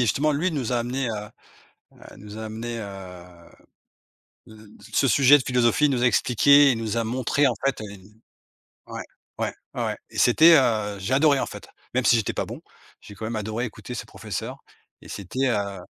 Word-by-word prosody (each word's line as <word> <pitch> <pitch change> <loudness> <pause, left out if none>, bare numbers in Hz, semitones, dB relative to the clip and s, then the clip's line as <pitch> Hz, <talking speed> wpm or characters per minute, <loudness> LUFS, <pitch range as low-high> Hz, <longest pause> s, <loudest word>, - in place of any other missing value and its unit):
justement 140 +6 +1
lui 160 +6 0
nous 135 -6 -3
a 120 - +1
amenés 125 +1 -2
à 105 -1 -7 0.7
à - - -14
nous 105 +1 -10
a 110 - -5
amenés, 115 +2 -5
heu, 95 -4 -9 1.3
l 110 - -14 0.3
ce 135 - +2
sujet 140 +4 +6
de 130 - -5
philosophie. 125 +3 +2
Il 145 - +2
nous 125 -3 -1
a 125 - +4
expliqué, 140 +4 +5
il 115 - -2
nous 110 0 -3
a 115 - +1
montré 130 +5 0
en 130 - +3
fait, 135 -1 0
heu - - -6 1.0
ouais - - -7 0.4
ouais, - - -2 0.2
ouais, - - -2
ouais - - -2
et - - -14
c'était, 160 +7 +6
heu, 110 -6 +1
j'adorais 135 +8 +2
en - - 0
fait, - - -10 0.2
même 130 0 0
si 120 - +6
j'étais 110 - -1
pas - - -3
bon. - - -9 0.4
J'ai 105 - -12
quand 110 +2 -6
même 115 0 -4
adoré 110 +3 -3
écouter 120 +2 -10
ce 115 - -6
professeur - - -6 0.5
et - - -14
c'était, 125 +8 -2
heu 100 -5 -2
120 Hz, 195 wpm, -24 LUFS, 110-135 Hz, 1.3 s, sujet